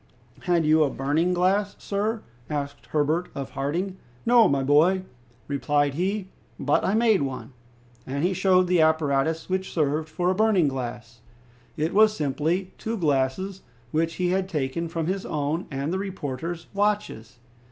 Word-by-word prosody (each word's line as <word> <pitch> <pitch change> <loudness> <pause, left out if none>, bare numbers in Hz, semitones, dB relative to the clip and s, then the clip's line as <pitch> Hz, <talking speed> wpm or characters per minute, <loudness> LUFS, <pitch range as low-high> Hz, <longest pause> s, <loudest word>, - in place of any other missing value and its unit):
"Had 175 -3 +2
you 155 +1 +4
a 145 - +1
burning 145 +7 0
glass, 190 +3 +1
sir?" 210 +2 -2 0.3
asked 145 -2 -4
Herbert 155 +4 0
of 140 -1 -5
Harding. 170 +8 -2 0.3
"No, 235 -2 +6
my 140 -3 +1
boy," 160 +7 +4 0.4
replied 145 +1 +1
he, 190 +4 -2 0.3
"but - - +2
I 195 - +1
made 220 -4 +4
one." 135 -1 -4 0.5
And 140 +3 -2
he 185 +2 +2
showed 185 0 +3
the 180 -2 +3
apparatus 155 0 +1
which 190 0 -2
served 155 0 0
for 180 +3 0
a - - -1
burning 210 -6 +3
glass. 120 -3 -5 0.6
It 155 +3 -1
was 215 +1 +5
simply 160 +6 -1
two 225 +1 -3
glasses 155 +4 0 0.3
which 165 +1 0
he 180 -1 0
had 190 +1 0
taken 155 0 -2
from 165 -1 -3
his 190 +3 -2
own 150 +3 -2
and 140 +4 -3
the 190 - -1
reporter's 170 -3 -5
watches. 200 - -1
165 Hz, 155 wpm, -25 LUFS, 145-190 Hz, 0.6 s, No